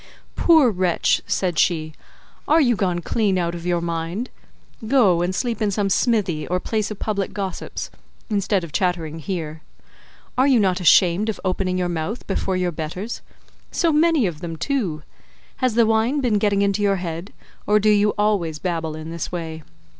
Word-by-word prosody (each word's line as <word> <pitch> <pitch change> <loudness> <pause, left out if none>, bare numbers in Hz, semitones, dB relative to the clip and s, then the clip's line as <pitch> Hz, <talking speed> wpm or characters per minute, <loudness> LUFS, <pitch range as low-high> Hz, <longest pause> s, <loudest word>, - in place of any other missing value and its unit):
"Poor 315 -8 +5
wretch," 180 -3 +1
said 180 -4 0
she, 155 -3 +1 0.5
"are 315 +2 +5
you 245 -6 +3
gone 180 -3 -1
clean 200 +1 0
out 170 -1 -1
of 170 0 -6
your 175 -1 +1
mind? 170 +7 -3 0.6
Go 210 -9 +4
and 180 +1 -1
sleep 235 -1 -2
in 210 - +2
some 200 0 0
smithy, 195 -10 +1
or 180 +1 0
place 215 +1 -2
of 215 - -6
public 200 -2 -2
gossips, 195 -3 -5 0.4
instead 200 -3 0
of 165 - -7
chattering 165 -3 -1
here. 160 -3 -5 0.8
Are 260 - +5
you 260 -4 +5
not 190 -3 +2
ashamed 180 +3 +4
of 220 - -3
opening 185 0 0
your 180 -1 0
mouth 175 +7 -4
before 190 -1 -1
your 180 -1 0
betters—so 185 - -4
many 315 -4 +3
of 170 -4 -4
them 165 -2 -5
too? 180 - -2 0.5
Has 255 -4 0
the 235 -1 +5
wine 225 +6 +2
been 235 -6 +1
getting 200 -1 +2
into 200 +1 +1
your 200 -1 +3
head, 175 +1 -5 0.4
or 210 +1 +4
do 215 +1 +3
you 210 0 +3
always 200 -7 +1
babble 165 -2 -3
in 155 +1 -7
this 170 -1 -5
way? 160 -2 -5
190 Hz, 175 wpm, -22 LUFS, 170-215 Hz, 0.8 s, Poor